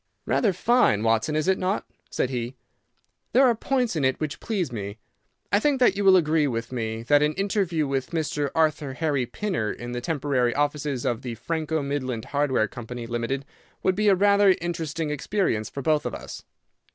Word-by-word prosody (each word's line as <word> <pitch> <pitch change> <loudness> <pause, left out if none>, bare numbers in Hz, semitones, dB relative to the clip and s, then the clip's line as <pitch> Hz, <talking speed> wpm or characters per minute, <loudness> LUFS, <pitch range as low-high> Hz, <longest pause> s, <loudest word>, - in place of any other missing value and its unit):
"Rather 215 - +2
fine, 185 - +3
Watson, 115 +7 +1
is 155 +3 0
it 190 0 +2
not?" 190 +2 -1 0.2
said 130 - -1
he. 120 0 -3 0.8
"There 265 +2 +6
are 245 - +5
points 250 -1 0
in 155 - 0
it 130 0 +1
which 155 -1 -3
please 190 - -2
me. 100 -2 -5 0.5
I 200 - +4
think 280 +3 +1
that 245 -6 +4
you 200 - -1
will 190 -1 +7
agree 155 -3 +2
with 115 -2 -3
me 115 -2 -3
that 145 +4 +4
an 150 +1 +2
interview 195 -5 0
with 135 -2 -2
Mr. 155 -3 -1
Arthur 155 -3 +1
Harry 145 -6 0
Pinner 185 - -2
in 120 0 -7
the 120 0 -3
temporary 135 -5 0
offices 145 -2 -1
of 120 0 0
the 125 -3 -5
Franco 160 +3 -2
Midland 130 -5 -3
Hardware 140 -6 +1
Company, 120 +1 -7
Limited, 120 +4 -3 0.4
would 185 - +3
be 210 +2 0
a 200 - +6
rather 200 0 +5
interesting 165 -2 -3
experience 150 - -1
for 140 - -6
both 155 0 +2
of - - -4
us." - - -9
150 Hz, 190 wpm, -25 LUFS, 125-185 Hz, 0.8 s, will